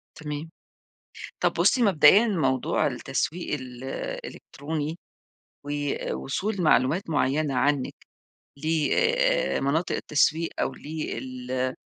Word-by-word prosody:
تمام، 150 Hz, 0 st, -6 dB, 0.9 s
طب -, -, +2 dB
بُصّي 250 Hz, -, +3 dB
مبدئيًا 195 Hz, +2 st, +6 dB
موضوع 135 Hz, -, +1 dB
التسويق 170 Hz, -1 st, -2 dB
الإلكتروني، 140 Hz, +4 st, -5 dB, 0.7 s
ووصول 145 Hz, +6 st, -2 dB
معلومات 155 Hz, -, +2 dB
معينة 145 Hz, -1 st, +1 dB
عنِّك 140 Hz, +1 st, +1 dB, 0.6 s
لمناطق 175 Hz, -, +1 dB
التسويق 155 Hz, +2 st, +1 dB
أو -, -, -1 dB
لال 130 Hz, -4 st, -4 dB
150 Hz, 75 wpm, -26 LUFS, 135-170 Hz, 0.9 s, مبدئيًا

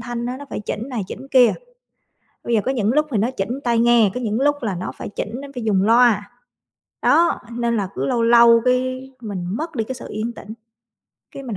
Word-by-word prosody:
thanh 240 Hz, 0 st, -4 dB
á, 250 Hz, +1 st, -4 dB
nó 285 Hz, -, -9 dB
phải -, -, -4 dB
chỉnh 215 Hz, +3 st, -5 dB
này 245 Hz, -6 st, -3 dB
chỉnh 260 Hz, +7 st, -9 dB
kia. 250 Hz, -3 st, +5 dB, 0.9 s
Bây 240 Hz, -, -2 dB
giờ 215 Hz, -, +2 dB
có 265 Hz, -, +1 dB
những 230 Hz, -3 st, 0 dB
lúc 300 Hz, +2 st, +3 dB
thì 230 Hz, -, 0 dB
nó 225 Hz, +5 st, +1 dB
chỉnh 245 Hz, +3 st, -3 dB
tai 235 Hz, -2 st, +1 dB
nghe, 235 Hz, -3 st, +4 dB
có -, -, -4 dB
những 220 Hz, +1 st, -1 dB
lúc 290 Hz, +1 st, +3 dB
là 205 Hz, -5 st, -1 dB
nó 175 Hz, -, -5 dB
phải -, -, -6 dB
chỉnh 210 Hz, -, -5 dB
nó 280 Hz, -, -8 dB
phải 245 Hz, -, -4 dB
dùng 200 Hz, -4 st, +2 dB
loa, 225 Hz, -1 st, +3 dB, 0.7 s
đó, 340 Hz, +1 st, +3 dB
nên 235 Hz, 0 st, -1 dB
là 200 Hz, -3 st, -1 dB
cứ 135 Hz, +2 st, -2 dB
lâu 230 Hz, -, 0 dB
lâu 235 Hz, 0 st, +6 dB
cái 255 Hz, +1 st, 0 dB
mình 200 Hz, -6 st, -5 dB
mất 325 Hz, +1 st, -5 dB
đi 225 Hz, -, 0 dB
cái 260 Hz, -, -5 dB
sự 250 Hz, -, -9 dB
yên 220 Hz, +3 st, -3 dB
tĩnh, 210 Hz, -, -13 dB, 0.8 s
cái 275 Hz, -, -9 dB
mình 235 Hz, -7 st, -5 dB
235 Hz, 235 wpm, -21 LUFS, 215-255 Hz, 0.9 s, lâu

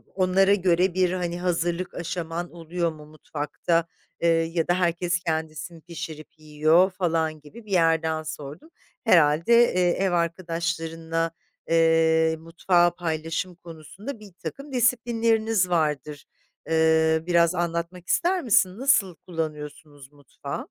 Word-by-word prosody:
onlara 190 Hz, +1 st, +3 dB
göre 180 Hz, -1 st, +2 dB
bir, 185 Hz, -1 st, +2 dB
hani, 175 Hz, -1 st, -3 dB
hazırlık 175 Hz, 0 st, -1 dB
aşaman 170 Hz, 0 st, -4 dB
oluyor 170 Hz, 0 st, -3 dB
mu 150 Hz, -1 st, -13 dB
mutfakta, 155 Hz, +2 st, -2 dB, 0.3 s
eee, 170 Hz, -, +2 dB
ya 165 Hz, 0 st, +1 dB
da 175 Hz, -, +3 dB
herkes 175 Hz, 0 st, 0 dB
kendisi 160 Hz, +1 st, -3 dB
mi 165 Hz, -, -14 dB
pişirip 160 Hz, -2 st, -8 dB
yiyor 155 Hz, +5 st, +3 dB
falan 165 Hz, -4 st, -1 dB
gibi 215 Hz, +10 st, -14 dB
bir 205 Hz, -, -12 dB
yerden 160 Hz, -2 st, +2 dB
sordum. 155 Hz, -, -8 dB, 0.3 s
Herhâlde, 170 Hz, 0 st, +4 dB, 0.2 s
eee, 180 Hz, -1 st, +2 dB
ev 190 Hz, +1 st, 0 dB
arkadaşlarınla, 165 Hz, -1 st, -2 dB, 0.4 s
eee, 165 Hz, 0 st, +3 dB
mutfağı 175 Hz, +1 st, +1 dB
paylaşım 165 Hz, +1 st, -3 dB
konusunda, 175 Hz, -, -10 dB
birtakım 215 Hz, +8 st, -9 dB
disiplinleriniz 225 Hz, -4 st, +1 dB
vardır. 150 Hz, -3 st, -1 dB, 0.4 s
Eee, 160 Hz, 0 st, +3 dB
biraz 170 Hz, 0 st, +3 dB
anlatmak 170 Hz, +1 st, -3 dB
ister 360 Hz, +1 st, +1 dB
misin? 195 Hz, -4 st, +3 dB
Nasıl 225 Hz, -10 st, +2 dB
kullanıyorsunuz 150 Hz, -3 st, -7 dB
mutfağı? 140 Hz, -1 st, -8 dB
170 Hz, 120 wpm, -25 LUFS, 160-185 Hz, 0.4 s, Herhâlde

